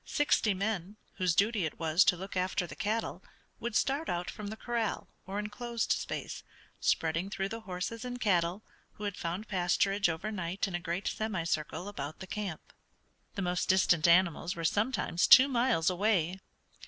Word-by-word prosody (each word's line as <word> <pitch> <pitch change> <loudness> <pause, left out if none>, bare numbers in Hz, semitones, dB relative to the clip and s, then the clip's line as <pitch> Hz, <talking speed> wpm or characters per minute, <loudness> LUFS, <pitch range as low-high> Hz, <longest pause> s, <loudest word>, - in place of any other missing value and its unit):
Sixty 230 -8 +2
men, 200 0 -3 0.2
whose 180 -3 +1
duty 210 -1 +2
it 155 - -3
was 165 +2 +4
to 180 - +4
look 190 +3 -7
after 185 0 0
the 145 - -9
cattle, 220 +3 -2 0.4
would 235 -2 -4
start 285 +4 +1
out 175 0 -2
from 210 - -7
the 220 +2 -6
corral, 235 -2 -2 0.2
or 195 +1 -4
enclosed 225 +3 -3
space, - - -2 0.4
spreading 165 +4 +1
through 195 -1 -2
the 225 - -5
horses 210 +3 -5
and 245 0 -5
cattle, 180 -2 +1 0.3
who 210 - -10
had 205 -2 -2
found 175 +6 -4
pasturage 195 +1 +2
over 165 +7 -3
night 185 0 -2
in 190 - -7
a 175 - -1
great 175 +3 -3
semicircle 175 -4 -2
about 150 -6 -5
the - - -8
camp. 195 -4 -6 0.6
The 200 - -2
most 180 0 -1
distant 175 -3 +4
animals 170 -1 +3
were 165 -1 -4
sometimes 205 -2 +1
two 260 +2 +9
miles 240 -10 +1
away. 185 -2 +1
195 Hz, 170 wpm, -31 LUFS, 175-215 Hz, 0.6 s, two